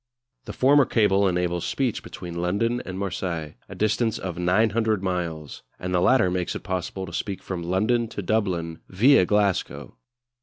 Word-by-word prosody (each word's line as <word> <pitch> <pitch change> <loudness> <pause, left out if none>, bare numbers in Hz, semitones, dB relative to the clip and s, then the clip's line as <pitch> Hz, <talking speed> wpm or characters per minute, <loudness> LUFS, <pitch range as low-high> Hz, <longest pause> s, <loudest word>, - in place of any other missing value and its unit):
The - - -6
former 140 +1 +5
cable 100 -4 +3
enables 90 -1 -1
speech 130 -5 -1
between 85 -1 -7
London 115 +7 0
and 95 0 -5
Marseilles, 85 -5 -3 0.2
a - - -8
distance 110 +1 +1
of 90 -3 -5
900 105 +4 +1
miles; 85 -5 -3 0.2
and 90 0 -4
the 90 - +2
latter 125 -5 +4
makes 90 -1 -2
it - - -6
possible 95 0 -3
to 85 - -10
speak 100 +2 -4
from 90 -2 -4
London 105 +7 +1
to 105 -2 -6
Dublin 90 -5 -1
viâ 105 0 +5
Glasgow. 105 -2 0
95 Hz, 160 wpm, -24 LUFS, 90-110 Hz, 0.2 s, former